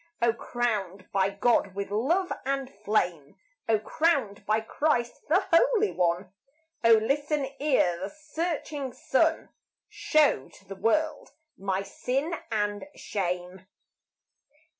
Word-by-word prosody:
O 235 Hz, -1 st, +3 dB
crowned 205 Hz, -6 st, -2 dB
by 195 Hz, 0 st, +2 dB
God 200 Hz, -1 st, +1 dB
with 200 Hz, 0 st, -4 dB
love 325 Hz, -, +1 dB
and 270 Hz, -1 st, -2 dB
flame! 180 Hz, -8 st, -1 dB, 0.3 s
O 220 Hz, -, +5 dB
crowned 225 Hz, -3 st, 0 dB
by 215 Hz, +1 st, +3 dB
Christ 240 Hz, +1 st, -1 dB
the 350 Hz, +6 st, +3 dB
Holy 435 Hz, +3 st, +4 dB
One! 180 Hz, +1 st, 0 dB, 0.5 s
O 230 Hz, 0 st, +7 dB
listen 285 Hz, +6 st, 0 dB
ere 255 Hz, -, +2 dB
the 190 Hz, +2 st, -4 dB
searching 305 Hz, -3 st, -4 dB
sun 320 Hz, +5 st, +1 dB, 0.4 s
Show 300 Hz, -, +2 dB
to 195 Hz, -, -19 dB
the 195 Hz, -, -7 dB
world 305 Hz, +11 st, 0 dB, 0.3 s
my 195 Hz, 0 st, -2 dB
sin 270 Hz, -, -2 dB, 0.2 s
and 205 Hz, +3 st, -1 dB
shame. 180 Hz, -1 st, -4 dB
225 Hz, 120 wpm, -27 LUFS, 195-295 Hz, 0.5 s, O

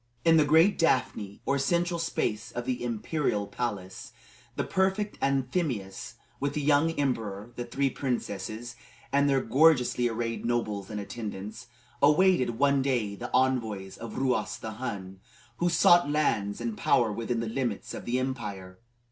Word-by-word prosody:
In 165 Hz, 0 st, +6 dB
the 155 Hz, -, +5 dB
great 160 Hz, +7 st, +4 dB
daphne, 105 Hz, -11 st, 0 dB
or 140 Hz, 0 st, +1 dB
central 170 Hz, +4 st, +1 dB
space 110 Hz, -10 st, -2 dB
of 120 Hz, 0 st, -5 dB
the 125 Hz, -1 st, -2 dB
imperial 115 Hz, -1 st, -1 dB
palace, 100 Hz, -3 st, -5 dB, 0.4 s
the -, -, -1 dB
prefect 190 Hz, +2 st, 0 dB
Anthemius, 130 Hz, -, -1 dB, 0.2 s
with 140 Hz, +1 st, -2 dB
the 150 Hz, -, 0 dB
young 145 Hz, +2 st, +3 dB
emperor, 115 Hz, -6 st, -2 dB
the 120 Hz, -, -4 dB
three 135 Hz, +1 st, 0 dB
princesses, 120 Hz, -2 st, -4 dB, 0.4 s
and 140 Hz, 0 st, +4 dB
their 135 Hz, -1 st, +3 dB
gorgeously 125 Hz, -5 st, +3 dB
arrayed 115 Hz, 0 st, -3 dB
nobles 110 Hz, -5 st, -1 dB
and 105 Hz, -1 st, -4 dB
attendants, 105 Hz, +1 st, -6 dB, 0.3 s
awaited, 150 Hz, -5 st, +4 dB
one 140 Hz, +1 st, +3 dB
day, 120 Hz, -7 st, 0 dB
the 120 Hz, +4 st, -6 dB
envoys 110 Hz, -7 st, 0 dB
of 115 Hz, +1 st, -8 dB
Ruas 130 Hz, -1 st, 0 dB
the 110 Hz, -, -6 dB
Hun, 100 Hz, -5 st, -6 dB, 0.4 s
who 175 Hz, -, +1 dB
sought 175 Hz, -1 st, +5 dB
lands 105 Hz, -9 st, 0 dB
and 115 Hz, -2 st, -3 dB
power 120 Hz, -3 st, +2 dB
within 115 Hz, +2 st, -2 dB
the 115 Hz, -, -2 dB
limits 115 Hz, -2 st, -3 dB
of -, -, -7 dB
the 120 Hz, +1 st, 0 dB
empire. 105 Hz, -8 st, -4 dB
120 Hz, 150 wpm, -28 LUFS, 110-140 Hz, 0.4 s, In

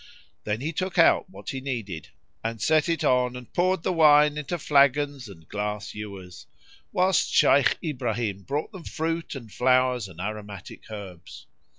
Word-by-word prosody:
Then 105 Hz, +2 st, -2 dB
he 160 Hz, +4 st, -3 dB
took 185 Hz, +3 st, -3 dB
out 165 Hz, +2 st, +5 dB
what 190 Hz, -, -8 dB
he 135 Hz, -2 st, -5 dB
needed 110 Hz, -, -5 dB, 0.3 s
and 115 Hz, 0 st, -3 dB
set 155 Hz, +8 st, +2 dB
it 165 Hz, -, 0 dB
on 125 Hz, -1 st, +2 dB
and 125 Hz, -1 st, -10 dB
poured 185 Hz, -1 st, +1 dB
the 185 Hz, -, 0 dB
wine 150 Hz, -2 st, +6 dB
into 150 Hz, +4 st, -3 dB
flagons 140 Hz, -3 st, +2 dB
and 80 Hz, -5 st, -14 dB
glass 105 Hz, 0 st, -4 dB
ewers, 100 Hz, -4 st, -9 dB, 0.4 s
whilst 185 Hz, -1 st, +2 dB
Shaykh 140 Hz, -1 st, +4 dB
Ibrahim 120 Hz, -, -2 dB
brought 145 Hz, -, -3 dB
them 190 Hz, -5 st, -10 dB
fruit 165 Hz, 0 st, -3 dB
and 115 Hz, -6 st, -9 dB
flowers 125 Hz, -3 st, +2 dB
and 90 Hz, -3 st, -14 dB
aromatic 105 Hz, 0 st, -7 dB
herbs. 100 Hz, -5 st, -9 dB
125 Hz, 160 wpm, -26 LUFS, 105-155 Hz, 0.4 s, wine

